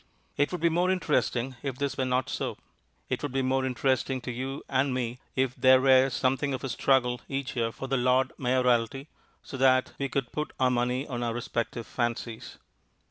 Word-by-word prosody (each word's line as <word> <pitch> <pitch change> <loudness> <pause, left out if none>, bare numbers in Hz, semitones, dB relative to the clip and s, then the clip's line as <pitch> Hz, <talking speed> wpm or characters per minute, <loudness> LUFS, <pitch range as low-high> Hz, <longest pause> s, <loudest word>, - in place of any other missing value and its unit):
It 145 - +1
would 180 -3 -4
be 170 - +4
more 175 +3 +1
interesting 135 -8 0
if 135 -3 -4
this 140 -1 -2
were 130 - -1
not 130 0 0
so; - - -3 0.5
it - - -2
would 145 -2 -3
be 135 0 0
more 130 +1 +1
interesting 130 0 0
to 125 - -5
you 130 +3 -5
and 135 0 +1
me 125 -1 -3 0.2
if 130 -1 +1
there 130 0 +5
were 130 0 +5
something 135 +2 0
of 130 - -8
a 135 - -3
struggle 125 -1 +2
each 135 0 -3
year 115 -2 0
for 135 - -7
the 135 0 +1
Lord 130 +1 +2
Mayorality, 125 +1 +1 0.3
so 135 - -7
that 130 -1 +3
we 140 -1 -1
could 135 -2 -2
put 150 0 -4
our 130 -1 +3
money 125 +2 0
on 120 -3 -4
our 115 -1 -1
respective 120 -1 -3
fancies. 120 -2 -4
130 Hz, 195 wpm, -28 LUFS, 125-135 Hz, 0.5 s, there